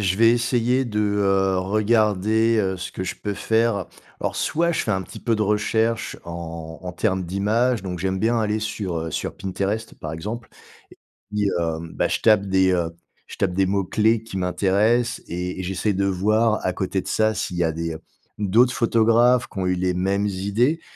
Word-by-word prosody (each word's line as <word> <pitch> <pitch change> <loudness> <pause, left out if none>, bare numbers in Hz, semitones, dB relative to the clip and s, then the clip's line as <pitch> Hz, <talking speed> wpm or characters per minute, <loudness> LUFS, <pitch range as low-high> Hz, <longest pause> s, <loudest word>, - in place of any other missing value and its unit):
je 95 -1 +1
vais 115 +1 +6
essayer 120 +2 +1
de, 105 -3 -3
heu, 95 -2 +2
regarder, 110 +2 +2
heu, 95 -2 0
ce 90 0 -6
que 95 - -5
je - - -3
peux 105 -1 -4
faire. 110 -4 +1 0.3
Alors - - -2
soit 170 +2 +1
je - - 0
fais 110 - -2
un 95 -2 0
petit - - -11
peu 115 -3 +1
de 105 - 0
recherches 110 +2 0
en 85 -1 -7
en 90 -1 -5
termes 95 0 0
d'images, 105 +5 +1
donc 90 -2 -5
j'aime 95 +1 -1
bien 115 +2 +1
aller 105 0 0
sur, 105 -6 -3
heu, 80 0 -4
sur - - -3
Pinterest 100 +3 -3
par 80 0 -5
exemple 110 +8 -6 0.8
et - - -4
puis 105 -1 +2
heu, 80 -1 -1 0.2
bah, - - +1
je - - -1
tape 110 -3 +5
des, 95 -1 +3
heu, 85 -2 0 0.4
je - - -10
tape 95 -2 0
des 95 +1 +2
mots-clés 105 +3 +1
qui 110 -4 -8
m'intéressent 100 +6 +1
et 90 +2 -4
et - - -3
j'essaye 95 +3 -1
de 100 +1 0
voir, 110 +4 +2
à 90 - +1
côté 95 +1 -2
de - - -8
ça, 110 0 +2
s'il 90 - -3
y 85 - +1
a 80 - +1
des, 85 0 -3
heu, 80 - -9 0.4
d'autres 110 +5 +3
photographes 115 +1 +3
qui 95 - -9
ont 90 - 0
eu 90 - +2
les 90 0 0
mêmes 100 +3 0
idées. 105 - 0
100 Hz, 205 wpm, -23 LUFS, 95-110 Hz, 0.8 s, vais